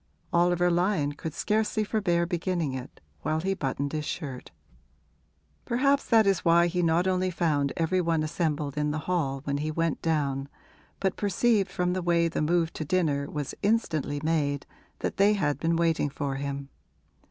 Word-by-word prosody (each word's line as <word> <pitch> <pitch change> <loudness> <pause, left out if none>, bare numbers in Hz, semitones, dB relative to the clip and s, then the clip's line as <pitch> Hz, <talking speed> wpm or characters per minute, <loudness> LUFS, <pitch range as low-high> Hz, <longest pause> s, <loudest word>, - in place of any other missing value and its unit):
Oliver 175 0 +3
Lyon 175 -4 +1
could 155 +1 -6
scarcely 215 0 0
forbear 190 -5 +1
beginning 170 -4 -1
it 130 0 -7 0.2
while 155 - 0
he 195 +4 0
buttoned 140 -4 -3
his 155 -1 -1
shirt. 140 -5 -5 1.1
Perhaps 275 +4 +2
that 225 -2 +5
is 195 -3 +2
why 170 +1 +5
he 175 +1 0
not 170 +1 +2
only 185 0 +1
found 150 -5 0
every 175 +3 +1
one 165 -2 +1
assembled 150 -3 -2
in 150 0 +1
the 150 - -1
hall 140 -7 -1
when 140 -1 -1
he 150 +2 -2
went 165 0 -1
down, 140 -4 -1 0.5
but 190 -1 0
perceived 205 +1 +2
from 180 0 0
the 185 - -1
way 170 -1 +2
the 165 - -2
move 165 +1 +1
to - - -4
dinner 150 -4 0
was 145 -3 -4
instantly 160 - 0
made 145 -3 0 0.4
that - - -2
they 200 +2 +5
had 150 -8 0
been 165 +2 +1
waiting 165 -3 +1
for 140 0 -3
him. 140 0 -4
165 Hz, 170 wpm, -27 LUFS, 145-180 Hz, 1.1 s, that